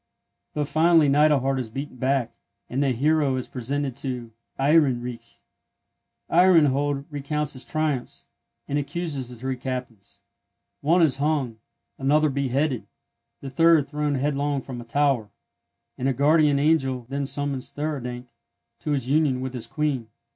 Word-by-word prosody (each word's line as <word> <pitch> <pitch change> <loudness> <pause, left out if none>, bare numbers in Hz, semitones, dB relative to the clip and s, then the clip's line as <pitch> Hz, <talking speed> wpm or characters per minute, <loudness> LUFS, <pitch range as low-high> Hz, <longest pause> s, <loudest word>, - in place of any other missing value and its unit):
But 150 -1 -1
finally 160 +1 +4
Neidelhard 140 -2 +3
is 120 -3 -4
beaten 135 +3 -6
back; 130 -1 0 0.4
and 130 +3 0
the 140 - +2
hero 140 +2 +2
is 130 - -3
presented 135 +1 -3
to 125 -4 -5 0.3
Ehrenreich. 135 -5 +1 0.9
Ehrenhold 145 -6 +4
recounts 150 +1 -2
his 130 - -4
triumphs, 155 -5 -2 0.4
and 145 +1 0
accuses 145 -3 -3
the 125 - -9
three 130 +2 -4
captains. 125 -5 -6 0.6
One 170 +4 +3
is 150 -5 +3
hung, 140 -6 -1 0.4
another 150 +3 +3
beheaded, 135 -1 -1 0.5
the 135 - -7
third 165 0 +4
thrown 150 0 -1
headlong 140 0 -1
from 125 -3 -7
a - - -11
tower, 130 -3 +1 0.7
and 130 - +1
a - - +1
guardian 145 +2 +4
angel 135 -4 +1
then 140 +1 -3
summons 140 -2 -3
Theurdank 125 -5 -4 0.5
to 150 - -3
his 135 -4 -1
union 140 -2 +2
with 130 0 -4
his 120 -3 -5
Queen. 140 -4 -1
140 Hz, 140 wpm, -24 LUFS, 130-150 Hz, 0.9 s, finally